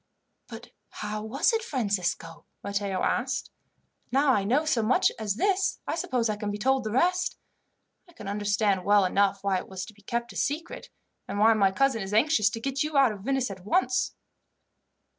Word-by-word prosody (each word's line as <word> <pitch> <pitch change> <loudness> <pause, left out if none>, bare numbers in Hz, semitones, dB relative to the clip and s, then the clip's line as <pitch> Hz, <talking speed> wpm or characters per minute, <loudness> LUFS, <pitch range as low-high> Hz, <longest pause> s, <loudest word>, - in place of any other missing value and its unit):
"But - - -11 0.2
how 210 0 -5
was 220 - +1
it, 450 - +1
Francisco?" 185 - -2 0.2
Matteo 200 -1 -2
asked. 260 +2 -1 0.6
"Now 270 +1 +3
I 205 - +1
know 260 +10 +1
so 255 -7 +1
much 220 +4 +3
as 210 -2 -1
this, 385 - +1
I - - -2
suppose 245 -3 -1
I 215 -1 -2
can 210 -1 -4
be 205 - -3
told 265 +4 +1
the 215 - -3
rest. 360 +9 +1 0.7
I - - -19
can 325 - -10
understand 205 -1 0
well 205 0 +4
enough 195 +1 +1
why 195 -1 +1
it - - -10
was 190 -1 -5
to 215 - -13
be 205 - -22
kept 235 +4 -3
a - - -16
secret, 310 +5 -3 0.4
and - - -4
why 220 +2 +5
my 200 -3 +3
cousin 265 +1 +1
is 195 +2 -3
anxious 220 -4 +4
to 225 - -6
get 275 +3 -2
you 300 -1 0
out 270 -4 +5
of 205 - -7
Venice 265 0 -1
at 185 -2 -10
once." 255 +5 +1
220 Hz, 195 wpm, -27 LUFS, 200-265 Hz, 0.7 s, why